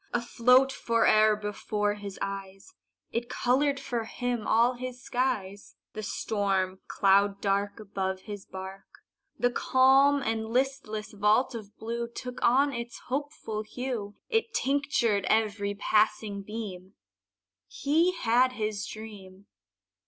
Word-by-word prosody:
Afloat 250 Hz, +3 st, +4 dB
fore'er 215 Hz, -3 st, +3 dB
before 210 Hz, 0 st, -2 dB
his 205 Hz, -2 st, -8 dB
eyes, 195 Hz, -, -7 dB, 0.4 s
It 235 Hz, +1 st, -3 dB
colored 275 Hz, +3 st, +1 dB
for 235 Hz, -2 st, -3 dB
him 245 Hz, -1 st, -3 dB
all 235 Hz, +3 st, +4 dB
his 250 Hz, 0 st, -6 dB
skies: 245 Hz, -6 st, -2 dB, 0.2 s
The 215 Hz, -, -5 dB
storm 195 Hz, -3 st, -1 dB
cloud 200 Hz, 0 st, +3 dB
dark 200 Hz, +1 st, 0 dB
Above 190 Hz, -2 st, -3 dB
his 205 Hz, -1 st, -8 dB
bark, 190 Hz, +1 st, -9 dB, 0.5 s
The 245 Hz, 0 st, +2 dB
calm 270 Hz, +3 st, +4 dB
and 220 Hz, 0 st, -1 dB
listless 240 Hz, -4 st, -1 dB
vault 210 Hz, +5 st, +2 dB
of 210 Hz, -3 st, -9 dB
blue 235 Hz, +1 st, -3 dB
Took 250 Hz, +1 st, -7 dB
on 275 Hz, +4 st, +4 dB
its 235 Hz, 0 st, -5 dB
hopeful 270 Hz, -5 st, -3 dB
hue, 220 Hz, -2 st, -5 dB
It 450 Hz, -1 st, 0 dB
tinctured 265 Hz, -7 st, +1 dB
every 205 Hz, -2 st, +1 dB
passing 210 Hz, 0 st, +1 dB
beam 195 Hz, -3 st, -7 dB, 0.7 s
He 335 Hz, -, +2 dB
had 255 Hz, -4 st, +2 dB
his 215 Hz, -3 st, -3 dB
dream. 200 Hz, -3 st, -10 dB
220 Hz, 120 wpm, -28 LUFS, 205-250 Hz, 0.7 s, Afloat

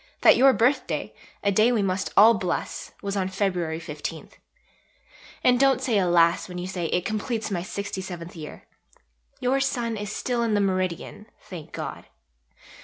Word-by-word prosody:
that -, -, +7 dB
your 270 Hz, +1 st, +6 dB
birthday, 255 Hz, +2 st, 0 dB, 0.3 s
a 200 Hz, -, +3 dB
day 215 Hz, +5 st, +4 dB
we 225 Hz, -4 st, +1 dB
must 185 Hz, 0 st, -1 dB
all 220 Hz, +3 st, +9 dB
bless 185 Hz, -4 st, -3 dB
was 200 Hz, 0 st, -2 dB
on 190 Hz, -1 st, 0 dB
Feb. 180 Hz, -5 st, -1 dB
15. 155 Hz, 0 st, -6 dB, 1.1 s
And 250 Hz, -1 st, +4 dB
don't 270 Hz, -2 st, +4 dB
say 240 Hz, -5 st, +1 dB
"alas!" 175 Hz, -1 st, +3 dB
when 180 Hz, -, -7 dB
you 180 Hz, -, -4 dB
say 180 Hz, -3 st, -3 dB
"it 180 Hz, +2 st, -1 dB
completes 215 Hz, 0 st, -2 dB
my 180 Hz, -3 st, -1 dB
67th 185 Hz, -3 st, -6 dB
year." 155 Hz, -2 st, -9 dB, 0.8 s
Your 260 Hz, +2 st, +1 dB
sun 240 Hz, -4 st, -1 dB
is 205 Hz, 0 st, -5 dB
still 240 Hz, +2 st, -2 dB
in 225 Hz, -2 st, +1 dB
the -, -, +3 dB
meridian, 185 Hz, +1 st, -2 dB
thank 170 Hz, -5 st, -10 dB
God! -, -, -6 dB
200 Hz, 160 wpm, -25 LUFS, 180-230 Hz, 1.1 s, all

